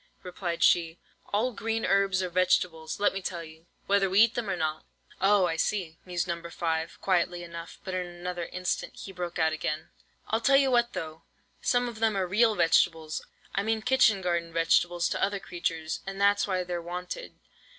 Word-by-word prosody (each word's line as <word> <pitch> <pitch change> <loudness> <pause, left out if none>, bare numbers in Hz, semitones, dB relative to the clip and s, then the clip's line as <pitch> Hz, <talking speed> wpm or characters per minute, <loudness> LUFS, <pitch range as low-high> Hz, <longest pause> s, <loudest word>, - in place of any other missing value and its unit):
replied 175 -2 -3
she. 165 -1 +3 0.3
"All 220 +5 +1
green 225 +1 -2
herbs 195 -1 +2
are 180 - -2
vegetables, 175 -3 +1
let 205 - +3
me 195 - -4
tell 175 -2 -4
you, 160 +1 -14 0.2
whether 200 -1 +3
we 195 +3 +5
eat 230 +1 +5
them 235 -4 -3
or 190 - 0
not." 155 -2 -2 0.4
"Oh, 195 -1 +5
I 165 -2 -1
see," 170 -4 -1
mused 175 -1 -2
No. 170 -1 -3
5, 165 -1 -3
quietly 175 -2 +1
enough, 170 0 -8
but 190 - -5
in 180 -1 -2
another 175 0 -5
instant 180 0 -3
he 195 - -8
broke 175 -2 -5
out 160 -1 +2
again. 155 0 -3 0.4
"I'll 220 +1 +1
tell 275 +3 +5
you 270 -1 +3
what 240 -1 +2
though, 160 0 -6 0.4
some 245 -1 +2
of 235 -2 -7
them 220 -2 +2
are 190 - +1
real 215 +4 +3
vegetables, 165 -2 +2 0.3
I 195 - +1
mean 220 +1 -1
kitchen 220 -7 +4
garden 170 -1 -1
vegetables, 170 +1 +2
to - - -2
other 200 0 0
creatures, 165 -3 -3
and 195 0 -5
that's 200 +1 +3
why 185 -2 0
they're 175 -1 -4
wanted. 180 - -6
180 Hz, 190 wpm, -28 LUFS, 170-200 Hz, 0.4 s, we